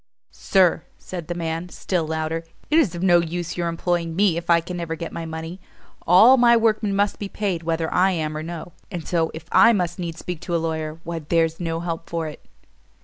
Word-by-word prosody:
"Sir," 185 -4 +2 0.2
said 175 -4 -7
the 175 - -3
man, 165 +1 -3
still 175 -3 -2
louder, 160 +1 -2 0.3
"it 315 - +6
is 220 - +1
of 175 - -4
no 175 -2 +6
use 170 0 -3
your 175 -1 -1
employing 170 0 -1
me, 195 -2 +3
if 170 0 -5
I 170 -1 +6
can 175 +2 -6
never 170 -2 -3
get 165 +1 -6
my 165 -1 -5
money. 160 +3 -6 0.5
All 220 +10 +8
my 235 -1 +6
workmen 215 -3 +1
must 205 +1 +1
be 200 - -4
paid 195 -6 -2
whether 165 -1 -2
I 185 +2 +4
am 155 -4 -2
or 155 - -3
no; 170 +1 -7 0.2
and 175 -5 -6
so, 165 -2 +1
if 160 0 -8
I 230 +1 +7
must 180 -3 -1
needs 170 -2 -4
speak 180 -1 -5
to 175 - -2
a - - +4
lawyer, 160 -1 -3
why 170 0 -4
there's 165 +1 0
no 165 -1 -2
help 165 -1 -5
for 165 -1 -2
it." 150 - -10
170 Hz, 220 wpm, -23 LUFS, 165-180 Hz, 0.5 s, All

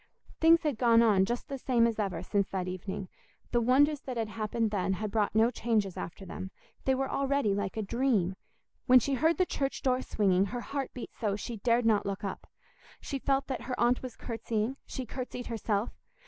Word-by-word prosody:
Things 330 +1 +6
had 290 -7 -1
gone 235 -2 +5
on 200 -4 +4
just 240 +4 -3
the 275 -1 -5
same 245 -2 +3
as 230 -1 0
ever 195 -4 -2
since 200 +1 0
that 185 -2 -2
evening; 185 +1 -5 0.4
the 240 - +2
wonders 280 +5 +4
that 255 -3 -5
had 225 -2 -1
happened 220 0 -1
then 190 -2 0
had 210 +2 -3
brought 210 -1 0
no 225 +2 +4
changes 215 -6 0
after 180 +3 -7
them; 190 +1 -6 0.4
they 265 - +3
were 270 +1 -1
already 275 -7 +1
like 200 +1 -3
a 220 - -1
dream. 210 -5 +1 0.5
When 255 - +8
she 275 +3 -1
heard 315 +6 +2
the 370 - +3
church 275 -5 -2
door 255 -1 +2
swinging, 195 -5 +2
her 240 +4 -4
heart 275 +2 -4
beat 250 - -6
so, 205 -3 -1
she 230 +2 -5
dared 235 +3 +2
not 215 -3 +3
look 195 0 -4
up. 195 - -5 0.5
She 275 - -4
felt 275 +1 +1
that 260 - -4
her 250 0 -4
aunt 240 +1 +3
was 255 -2 -7
curtsying; 225 +1 -2
she 260 - -5
curtsied 250 -1 -6
herself. 220 -1 -1
230 Hz, 205 wpm, -30 LUFS, 205-260 Hz, 0.5 s, When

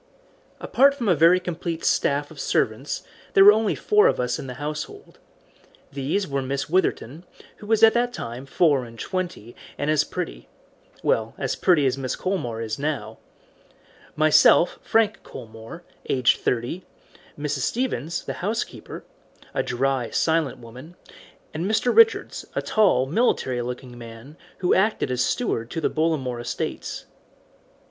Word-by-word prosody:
Apart 275 +2 +3
from 240 -6 -3
a 185 - +5
very 170 +3 +5
complete 170 -2 -4
staff 145 +1 +1
of 155 - -12
servants 115 +1 -1 0.3
there 195 - +8
were 205 - +11
only 215 0 +1
four 420 0 +4
of - - +1
us 125 0 -1
in - - -7
the 125 - -7
household. 150 +2 -7 0.7
These 145 +8 -2
were 140 -1 -2
Miss 135 +1 -3
Witherton, 165 -3 -1 0.3
who 210 - -12
was 225 0 +2
at 225 - +8
that 240 +1 +1
time 125 - -7
four 145 -2 +2
and 115 -1 -11
twenty 180 - -4 0.2
and 145 +2 0
as 155 - +3
pretty - - -6 0.5
well, 110 0 0
as 135 -2 -2
pretty 170 -7 +3
as 130 0 +1
Mrs. 130 -2 -3
Colmore 125 -13 -3
is 110 +1 -4
now 150 0 -3 1.0
myself, 155 +2 +5
Frank 220 -1 +1
Colmore, 115 +9 -11 0.3
aged 130 -2 +3
thirty, 125 +10 -2 0.5
Mrs. 145 -1 -2
Stevens, 170 - -2
the - - -3
housekeeper, 215 +5 -4 0.5
a - - +1
dry, 130 -1 -1
silent 160 -4 0
woman, 125 +9 -12 0.6
and 170 +5 -2
Mr. 220 +3 +1
Richards, 455 0 +4
a - - -1
tall 195 -12 +3
military 135 - 0
looking 125 0 -6
man, 115 +5 -11 0.3
who 180 - +3
acted 200 -6 +1
as 125 -1 +1
steward 115 - -1
to 165 - -4
the 160 - 0
Bollamore 145 -7 -1
estates. - - -5
150 Hz, 150 wpm, -24 LUFS, 125-185 Hz, 1.0 s, were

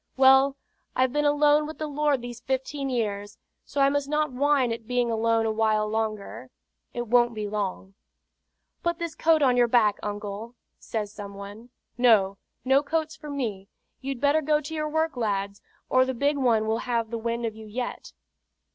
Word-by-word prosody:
"Well, 265 +1 +6 0.4
I've 255 0 +2
been 295 0 +1
alone 295 +1 +4
with 315 - -8
the 310 - -3
Lord 295 -3 0
these 240 -1 -7
fifteen 270 +2 -3
years, 205 -4 -3 0.3
so 280 - -2
I 275 - +5
must 285 0 -1
not 300 -1 0
whine 270 -1 +2
at 230 -1 -8
being 245 -1 +1
alone 225 0 +1
a 220 - +1
while 215 -1 +1
longer 220 +2 -3 0.4
it 240 0 -4
won't 240 0 +3
be 210 -1 -3
long." 195 -2 -4 0.9
"Put 340 -1 -1
this 335 -2 -4
coat 320 -2 +3
on 255 -2 +4
your 240 -1 +5
back, 225 -4 +3
uncle," 210 +3 -5 0.2
says 210 -2 -4
some 200 -2 -8
one. 205 +4 -10 0.3
"No; 200 -5 +4 0.3
no 265 +2 +4
coats 315 +1 -2
for 300 -1 -10
me. 220 -9 -4 0.3
You'd 270 -1 -4
better 290 +3 +3
go 300 0 +2
to 305 +2 -8
your 305 -1 -2
work, 315 0 0
lads, 200 -4 -2 0.3
or 255 0 +4
the 260 0 -2
big 285 +4 +1
one 235 -5 +2
will 220 +1 0
have 230 -2 0
the 230 - -3
wind 235 +1 -2
of 220 -1 -3
you 220 0 -11
yet." 245 +4 -5
245 Hz, 185 wpm, -26 LUFS, 220-285 Hz, 0.9 s, Well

